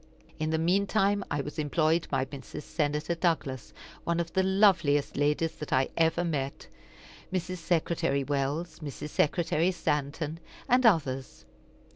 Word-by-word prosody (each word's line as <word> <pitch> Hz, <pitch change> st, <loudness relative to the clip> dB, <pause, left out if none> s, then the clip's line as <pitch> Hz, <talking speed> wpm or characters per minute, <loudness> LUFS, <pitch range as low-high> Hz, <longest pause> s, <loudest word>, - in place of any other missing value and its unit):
In 155 Hz, 0 st, -1 dB
the 160 Hz, -, +1 dB
mean 185 Hz, +5 st, +2 dB
time 200 Hz, -1 st, +2 dB
I 145 Hz, -, 0 dB
was 150 Hz, +2 st, -6 dB
employed 155 Hz, +2 st, +1 dB
by 135 Hz, -1 st, 0 dB
Mrs. 140 Hz, +2 st, -8 dB
Senator 150 Hz, +1 st, -1 dB
Douglas, 155 Hz, -7 st, -1 dB, 0.3 s
one 170 Hz, 0 st, 0 dB
of 170 Hz, -1 st, -3 dB
the 190 Hz, -, +3 dB
loveliest 185 Hz, -7 st, +3 dB
ladies 150 Hz, +3 st, +1 dB
that 150 Hz, -, -7 dB
I 130 Hz, 0 st, +2 dB
ever 165 Hz, +1 st, +2 dB
met, 140 Hz, -5 st, -3 dB, 0.6 s
Mrs. 185 Hz, 0 st, -2 dB
Secretary 165 Hz, -4 st, 0 dB
Wells, 145 Hz, +4 st, -2 dB
Mrs. 150 Hz, -1 st, -6 dB
Secretary 165 Hz, +3 st, +1 dB
Stanton, 150 Hz, -1 st, -2 dB, 0.3 s
and 250 Hz, 0 st, +5 dB
others. 135 Hz, -, 0 dB
160 Hz, 140 wpm, -29 LUFS, 145-175 Hz, 0.6 s, and